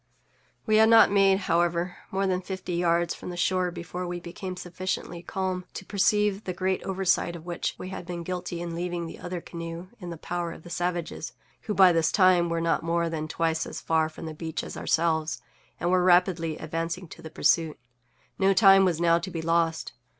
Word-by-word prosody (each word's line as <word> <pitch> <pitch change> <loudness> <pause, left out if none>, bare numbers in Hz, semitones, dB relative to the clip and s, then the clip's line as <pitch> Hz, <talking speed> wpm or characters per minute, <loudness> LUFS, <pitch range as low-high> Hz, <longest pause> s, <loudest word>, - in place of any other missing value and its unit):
We 215 -1 +3
had 220 0 +6
not 225 -3 +7
made, 195 -1 +4
however, 175 0 0
more 195 +1 0
than 185 -1 0
fifty 185 -1 -5
yards 170 0 +1
from - - -8
the 175 - -6
shore 185 0 +1
before 175 +1 -6
we 175 0 -4
became 180 +2 -7
sufficiently 180 -1 -4
calm 185 0 -3
to 190 - -6
perceive 210 +1 +1
the 185 - -3
great 190 0 0
oversight 190 -2 0
of 165 -1 -10
which 175 -1 -3
we 185 - -7
had 185 -2 -7
been 175 -1 -5
guilty 180 -1 -4
in 170 -1 -5
leaving 175 0 -3
the 165 - -9
other 180 -1 -5
canoe 170 +2 -7
in 180 -3 -7
the 170 - -6
power 170 +1 -4
of - - -13
the 175 - -11
savages, 175 0 -3 0.3
who, 210 - -1
by 190 -2 +7
this 165 -2 +2
time, 185 -3 +4
were 170 0 0
not 165 0 +1
more 170 0 0
than 155 -1 -3
twice 160 0 -1
as - - -6
far 160 -1 +1
from 160 - -10
the 160 - -5
beach 160 +1 -4
as - - -7
ourselves, 160 -1 0 0.4
and 175 +2 0
were 185 -1 +3
rapidly 175 -3 +3
advancing 165 +3 -4
to - - -11
the 160 - -8
pursuit. 160 0 +2 0.6
No 195 0 +4
time 195 -2 +7
was 170 -3 +1
now 170 0 +4
to 190 - -6
be 165 -3 -5
lost. 165 0 0
175 Hz, 205 wpm, -27 LUFS, 165-185 Hz, 0.6 s, not